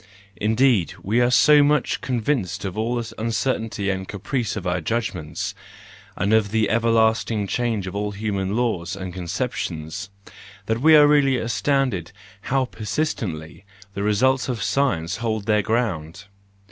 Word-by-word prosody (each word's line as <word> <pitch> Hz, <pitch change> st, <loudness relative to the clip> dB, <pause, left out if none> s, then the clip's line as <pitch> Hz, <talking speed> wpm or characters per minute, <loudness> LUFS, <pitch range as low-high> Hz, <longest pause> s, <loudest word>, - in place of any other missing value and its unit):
Indeed, 110 Hz, -, +2 dB
we 110 Hz, +5 st, +2 dB
are 120 Hz, -, +4 dB
so 150 Hz, +3 st, +6 dB
much 145 Hz, -1 st, +1 dB
convinced 120 Hz, -, -1 dB
of 95 Hz, -, -4 dB
all 115 Hz, +3 st, -1 dB
the 115 Hz, -2 st, -4 dB
uncertainty 110 Hz, -3 st, -1 dB
and 95 Hz, 0 st, -4 dB
caprice 115 Hz, +4 st, -3 dB
of 100 Hz, -3 st, -5 dB
our 90 Hz, 0 st, 0 dB
judgments, 90 Hz, -6 st, -3 dB, 0.6 s
and 100 Hz, +4 st, 0 dB
of 110 Hz, -2 st, +3 dB
the 110 Hz, 0 st, +1 dB
everlasting 115 Hz, -2 st, +2 dB
change 115 Hz, -2 st, -1 dB
of 95 Hz, +1 st, -6 dB
all 105 Hz, 0 st, -1 dB
human 100 Hz, -1 st, -2 dB
laws 100 Hz, -6 st, -1 dB
and 95 Hz, -2 st, -6 dB
conceptions, 90 Hz, -2 st, -4 dB, 0.6 s
that 110 Hz, +2 st, -1 dB
we 160 Hz, +2 st, +7 dB
are 150 Hz, -1 st, +8 dB
really 140 Hz, -3 st, +4 dB
astonished 115 Hz, -, 0 dB, 0.4 s
how 135 Hz, 0 st, +2 dB
persistently 105 Hz, -, -4 dB, 0.3 s
the 100 Hz, -, -4 dB
results 125 Hz, +6 st, +2 dB
of 120 Hz, -3 st, -2 dB
science 90 Hz, -11 st, 0 dB
hold 110 Hz, -3 st, -2 dB
their 105 Hz, -1 st, +3 dB
ground! 100 Hz, -6 st, -2 dB
110 Hz, 145 wpm, -23 LUFS, 95-125 Hz, 0.6 s, are